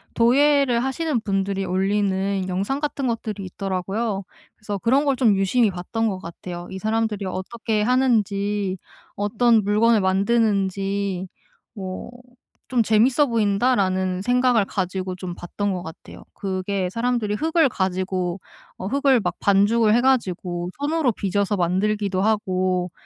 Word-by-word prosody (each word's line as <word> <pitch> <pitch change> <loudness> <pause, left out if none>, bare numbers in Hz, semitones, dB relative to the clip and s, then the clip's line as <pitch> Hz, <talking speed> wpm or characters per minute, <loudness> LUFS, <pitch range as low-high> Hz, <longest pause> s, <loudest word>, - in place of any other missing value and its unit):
도예를 260 0 +3
하시는 270 -2 -1
분들이 195 -1 -1
올리는 195 0 0
영상 200 +10 -1
같은 280 -3 -2
것들이 215 -4 -3
있더라고요. 195 +3 -3 0.3
그래서 205 -2 -5
그런 270 +7 +2
걸 275 -2 +2
좀 225 -6 +4
유심히 205 +2 +2
봤던 220 +5 -2
것 190 -2 -4
같아요. 175 +1 -8
이 190 - -5
사람들이 220 -2 -1
어떻게 210 +4 -2
하는지 210 -6 +1 0.4
어떤 220 +2 +2
물건을 215 +1 +3
만드는지 195 -2 0 0.5
뭐 190 +3 -6 0.6
'좀 245 -3 +2
재밌어 240 +7 +3
보인다.'라는 200 -4 +1
생각을 245 -3 +3
가지고 185 -1 -3
좀 180 -1 -6
봤던 200 +3 -3
것 180 -1 -4
같아요. 160 - -11
그게 190 -1 -2
사람들이 230 -3 -1
흙을 320 +1 +2
가지고 185 -1 -2 0.4
어 190 - -5
흙을 270 -1 +3
막 175 -2 -2
반죽을 210 +2 +3
해가지고 185 -9 0
손으로 295 -3 +1
빚어서 200 +1 -1
만들기도 190 +2 0
하고 185 -4 0
205 Hz, 305 characters per minute, -22 LUFS, 190-235 Hz, 0.6 s, 좀